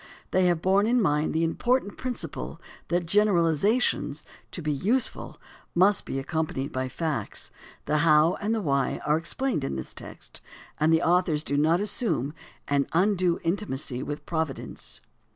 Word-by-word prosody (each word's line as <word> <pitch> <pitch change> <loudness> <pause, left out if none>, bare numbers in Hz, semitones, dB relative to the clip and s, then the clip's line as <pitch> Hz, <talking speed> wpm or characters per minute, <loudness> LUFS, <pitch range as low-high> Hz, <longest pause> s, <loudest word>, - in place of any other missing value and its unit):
They 185 0 +3
have 170 -2 +1
borne 195 +3 +3
in 245 +2 +3
mind 150 -6 +2
the 160 +1 +1
important 220 +6 0
principle 255 -2 -5 0.3
that 175 0 0
generalizations, 200 - +2 0.2
to 175 - -5
be 150 - 0
useful, 215 - -1 0.4
must 190 +3 +4
be - - -3
accompanied 140 -1 -2
by 130 0 -2
the - - -5
facts. 135 -5 -3 0.3
The 150 +1 +1
how 155 +1 +5
and 215 +2 0
the 220 - -2
why 140 -4 0
are 150 - +3
explained 205 +12 -1
in 70 - -2
this 65 - -6
text, - - -8 0.4
and 155 +1 +3
the 160 +1 +3
authors 170 -3 +2
do 140 - -2
not 160 +4 +3
assume 205 - -1 0.3
an 140 -1 +1
undue 180 -1 +2
intimacy 155 -8 -2
with 145 +2 -5
providence. 160 -4 -4
165 Hz, 155 wpm, -27 LUFS, 150-200 Hz, 0.4 s, how